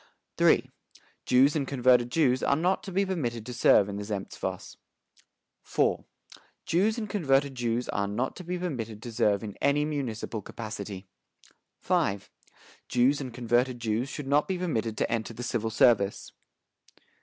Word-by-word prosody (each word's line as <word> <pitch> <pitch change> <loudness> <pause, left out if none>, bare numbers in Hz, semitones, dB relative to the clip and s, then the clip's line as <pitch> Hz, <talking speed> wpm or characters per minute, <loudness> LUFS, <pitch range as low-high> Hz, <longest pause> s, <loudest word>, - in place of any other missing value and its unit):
"III. - - +5 0.6
Jews 135 +4 +5
and 140 -3 -1
converted 125 -2 +3
Jews 130 -3 +2
are 140 - +2
not 180 +5 +1
to 195 - -8
be 195 +2 +1
permitted 120 - -3
to 125 - -6
serve 105 -4 +5
in 100 -1 -5
the 105 - -4
Zemstvos. 100 -2 -5 0.9
"IV. - - 0 0.6
Jews 205 +7 +2
and 220 -2 -3
converted 140 -9 +1
Jews 120 -1 -1
are 100 0 -1
not 120 +6 -2
to 185 - -8
be 180 +1 -3
permitted 115 - -5
to 120 - -7
serve 105 -3 +2
in 105 -2 -6
any 145 +1 +2
municipal 120 -7 -3
capacity. 100 -3 -7 0.8
"V. 100 - +1 0.7
Jews 130 +4 +3
and 130 -2 -5
converted 120 +1 0
Jews 115 +3 -1
should 145 - -6
not 145 +2 +2
be 190 - -1
permitted 115 -11 -2
to - - -1
enter 115 0 -2
the 120 - -6
civil 115 -2 -1
service. 105 -3 +2
125 Hz, 155 wpm, -28 LUFS, 110-145 Hz, 0.9 s, III